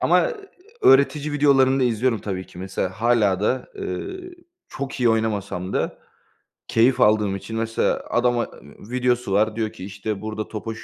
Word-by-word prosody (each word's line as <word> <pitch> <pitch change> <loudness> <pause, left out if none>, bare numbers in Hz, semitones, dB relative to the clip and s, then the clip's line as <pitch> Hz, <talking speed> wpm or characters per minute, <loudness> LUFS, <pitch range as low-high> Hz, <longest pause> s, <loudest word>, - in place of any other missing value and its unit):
Ama, - - +3
eee, 485 - -5 0.5
öğretici 140 +2 +4
videolarını 135 -2 +4
da 130 - +3
izliyorum 120 0 +1
tabii 95 -2 -4
ki. - - -14
Mesela 95 0 -2
hâlâ 105 -3 +2
da, 125 +5 0
eee, 380 -2 -6 0.3
çok 135 -1 -6
iyi 120 - +4
oynamasam 100 -5 -1
da - - -2 0.7
keyif 120 +3 +3
aldığım 105 -2 +3
için 110 +3 -6
mesela 115 0 0
adama, 120 -1 +2
ııı, 105 - -15
videosu 125 -3 0
var, 105 +2 +2
diyor 110 -1 -1
ki: 90 - -9
"İşte 100 +1 -5
burada 110 0 -4
topa 110 +1 -5
şu - - -11
115 Hz, 165 wpm, -23 LUFS, 105-130 Hz, 0.7 s, öğretici